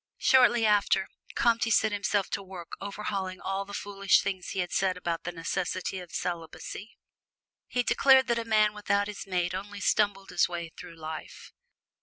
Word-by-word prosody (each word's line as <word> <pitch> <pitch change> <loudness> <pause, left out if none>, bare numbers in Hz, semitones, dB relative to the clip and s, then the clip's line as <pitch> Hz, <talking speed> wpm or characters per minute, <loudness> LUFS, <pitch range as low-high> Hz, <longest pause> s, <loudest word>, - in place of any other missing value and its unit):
Shortly 240 -3 +5
after, 205 -2 +3 0.3
Comte 235 -1 +3
set 220 0 +4
himself 205 -1 0
to - - -1
work 185 -3 -10
overhauling 195 -2 -4
all 195 +1 -3
the 200 0 -8
foolish 200 -1 +2
things 190 -2 -3
he - - -5
had 180 -1 -1
said 185 -1 +1
about 170 -2 -3
the 175 - -2
necessity 180 +2 -3
of 175 -2 -10
celibacy. 175 +4 -5 0.7
He 245 - 0
declared 265 +1 +5
that 235 -1 +1
a - - -2
man 215 -1 +3
without 205 -1 0
his 205 -1 -7
mate 180 -1 0
only 200 +2 -5
stumbled 200 -1 +1
his 175 - +2
way 170 -2 -5
through 165 - -10
life. 160 -1 -8
195 Hz, 170 wpm, -28 LUFS, 180-210 Hz, 0.7 s, Shortly